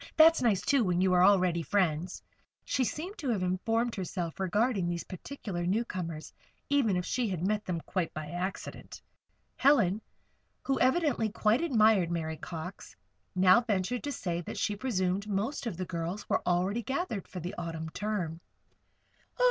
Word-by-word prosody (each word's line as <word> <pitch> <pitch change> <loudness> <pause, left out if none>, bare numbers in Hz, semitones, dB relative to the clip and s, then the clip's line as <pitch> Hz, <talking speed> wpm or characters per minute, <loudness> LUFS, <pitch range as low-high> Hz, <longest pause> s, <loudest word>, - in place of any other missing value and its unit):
That's 325 +1 +7
nice, 220 -6 +3
too, 275 -4 +3
when 180 -3 +1
you 185 0 +3
are 180 0 +5
already 185 -3 +4
friends." 175 -1 0 0.4
She 265 - +1
seemed 355 - -4
to 280 - -2
have 210 -6 0
informed 225 +6 0
herself 180 -3 -4
regarding 195 0 +1
these 170 -1 -2
particular 185 -2 -6
newcomers, 180 -6 -2 0.4
even 255 -10 +3
if 180 - -2
she 245 -4 0
had 180 -2 -2
met 210 +1 0
them 175 -2 -2
quite 180 -1 -2
by 155 0 -5
accident. 180 +2 -5 0.6
Helen, 225 -8 +4 0.6
who 270 -1 0
evidently 260 -4 +2
quite 215 +4 +2
admired 220 - +4
Mary 160 -2 -2
Cox, 180 +3 -7 0.4
now 185 +5 +6
ventured 225 +1 -1
to 290 - -2
say 175 -9 -2
that - - -7
she 210 - 0
presumed 200 -4 -1
most 215 +6 -2
of 195 -7 -4
the 185 - -3
girls 170 +3 -4
were - - +1
already 185 +6 +1
gathered 265 - -3
for 185 - -7
the 175 +2 -5
Autumn 165 -1 -4
term. 180 -6 -3
195 Hz, 160 wpm, -30 LUFS, 175-235 Hz, 0.6 s, That's